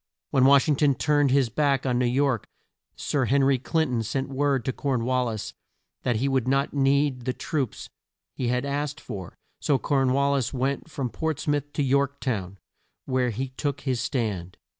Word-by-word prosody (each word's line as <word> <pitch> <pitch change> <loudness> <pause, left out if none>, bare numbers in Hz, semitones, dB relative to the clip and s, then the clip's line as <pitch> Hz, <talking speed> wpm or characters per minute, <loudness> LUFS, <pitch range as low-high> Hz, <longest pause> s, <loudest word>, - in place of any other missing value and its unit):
When 130 -1 +4
Wash 140 +1 +6
ing 150 - +3
ton 140 -2 +3
turned 145 -1 +2
his 135 -2 +3
back 140 +2 +1
on 125 -2 +1
New 125 - +2
York, 130 -2 +1 0.5
Sir 140 -3 0
Hen 140 +2 +3
ry 135 -1 +3
Clin 160 +5 +1
ton 120 -2 0
sent 130 +5 -2
word 135 -2 0
to 130 - -1
Corn 130 -5 -1
wal 125 0 +1
lis 110 -3 -4 0.5
that 120 - 0
he 125 +6 0
would 130 -3 +1
not 135 +1 +1
need 140 -2 +2
the 130 - 0
troops 135 -5 -3 0.5
he 125 - -2
had 125 +2 0
asked 145 +1 -2
for; 95 -4 -8 0.2
so 140 - +2
Corn 135 -2 +1
wal 140 +1 +2
lis 135 -2 -1
went 135 +5 -1
from 135 -6 -3
Ports 160 +6 -3
mouth 145 -1 0
to 145 - 0
York 140 +1 +1
town, 100 -7 -3 0.5
where 130 -1 +1
he 130 +4 -3
took 140 +1 -3
his 130 -4 -1
stand. 105 - -2
135 Hz, 195 wpm, -26 LUFS, 125-140 Hz, 0.5 s, Wash